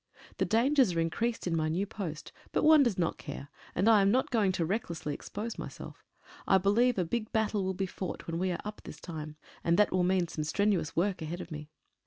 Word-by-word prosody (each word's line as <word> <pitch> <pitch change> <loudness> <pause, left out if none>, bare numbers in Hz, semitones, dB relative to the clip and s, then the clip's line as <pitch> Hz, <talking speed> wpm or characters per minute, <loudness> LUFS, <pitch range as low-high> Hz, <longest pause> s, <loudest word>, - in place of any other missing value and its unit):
The - - +3
dangers 245 -1 +3
are - - +1
increased 225 +8 -1
in 175 -2 0
my 155 -1 +1
new 180 +5 0
post, 185 -7 -6 0.2
but - - +1
one 310 -1 +7
does 235 -8 +2
not 170 -2 0
care, 145 -1 -7 0.3
and 190 +5 +2
I 220 -3 +7
am 195 - +4
not 255 +5 +2
going 215 -5 +3
to 170 - 0
recklessly 170 -6 -2
ex - - -9
pose 220 +3 -5
myself. - - -8 0.4
I 195 - +6
believe 220 +6 +3
a 180 - +1
big 215 +5 -3
battle 215 -2 +1
will 190 0 -1
be 190 +1 -1
fought 185 -1 -6
when 165 0 -3
we 185 0 0
are 175 - -2
up 210 0 -6
this - - -9
time, 155 -3 -7 0.3
and 170 +1 +3
that 210 - +4
will 185 - +2
mean 180 -1 +2
some 155 -1 -4
strenuous 195 +1 0
work 185 +1 0
ahead 165 +3 -4
of 175 - -8
me. 150 0 -7
190 Hz, 235 wpm, -30 LUFS, 165-215 Hz, 0.4 s, one